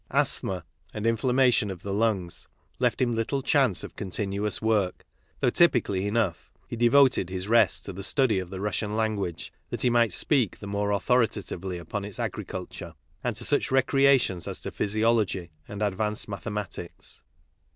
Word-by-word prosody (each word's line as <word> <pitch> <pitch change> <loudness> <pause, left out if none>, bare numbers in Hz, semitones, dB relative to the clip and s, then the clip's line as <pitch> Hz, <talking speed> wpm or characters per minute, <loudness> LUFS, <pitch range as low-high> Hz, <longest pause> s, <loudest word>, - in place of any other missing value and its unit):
Asthma 90 -4 0 0.3
and 105 0 -3
infiainmation 125 -1 +3
of 95 -2 -7
the 100 - -3
lungs 100 -5 -1 0.3
left - - +1
him 125 -2 +1
little 115 +4 -1
chance 130 -9 +2
of - - -9
con 100 - -5
tinuous 100 +2 -2
work, 105 -5 0 0.4
though 125 - +3
typically 110 - +3
enough, 105 -5 -1 0.2
he - - -5
devoted 120 -4 +4
his 95 +1 -4
rest 110 -8 +3
to 100 - -6
the 95 - -7
study 110 0 +2
of 90 -2 -6
the 95 - -6
Russian 105 +1 -2
language 105 -6 -2 0.2
that - - -2
he 125 - +3
might 120 -2 +3
speak 130 - +1
the - - -10
more 100 0 -1
authoritatively 100 -4 0
upon 85 +4 -5
its 100 -1 -7
agriculture, 90 -2 -5 0.3
and 120 -3 -1
to 120 +2 +1
such 145 - +2
recreations 135 - +3
as - - -4
physiology 105 -4 0 0.2
and 105 +1 -4
advanced 105 +1 -1
mathe 105 +1 -5
matics. 100 -4 -7
105 Hz, 160 wpm, -27 LUFS, 95-120 Hz, 0.4 s, devoted